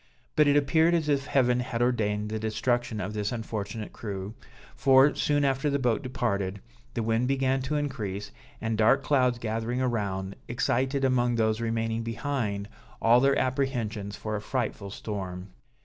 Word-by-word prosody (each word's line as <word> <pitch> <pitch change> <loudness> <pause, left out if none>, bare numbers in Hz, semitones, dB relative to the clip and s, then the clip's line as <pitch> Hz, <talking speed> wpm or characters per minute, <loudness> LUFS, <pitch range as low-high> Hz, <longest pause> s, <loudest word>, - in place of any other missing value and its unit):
But 150 -1 +5
it 145 0 +5
appeared 160 +4 +4
as 160 -3 0
if 140 -1 +1
Heaven 125 -2 +3
had 125 -1 -3
ordained 105 -4 +1
the 110 0 -2
destruction 110 +1 -1
of 100 +2 -3
this 105 -1 -2
unfortunate 110 -2 -4
crew, 100 -1 -5 0.4
for, 135 +1 +5
soon 145 -1 +1
after 135 +2 +1
the 140 - +1
boat 125 -4 +1
departed, 100 -6 -2 0.4
the 115 - 0
wind 115 +2 +1
began 135 0 +1
to 135 +4 -2
increase, 105 -9 -3 0.3
and 110 0 -2
dark 135 +5 +4
clouds 125 -4 +2
gathering 115 +2 -2
around, 100 -6 -2
excited 130 +3 0
among 120 -2 +2
those 110 0 +1
remaining 115 0 -1
behind 115 -4 -2 0.3
all 115 +2 +5
their 135 +2 +3
apprehensions 120 -6 -1
for 110 0 -4
a 105 - -3
frightful 110 -4 -3
storm. 95 -2 -5
115 Hz, 160 wpm, -28 LUFS, 105-135 Hz, 0.4 s, But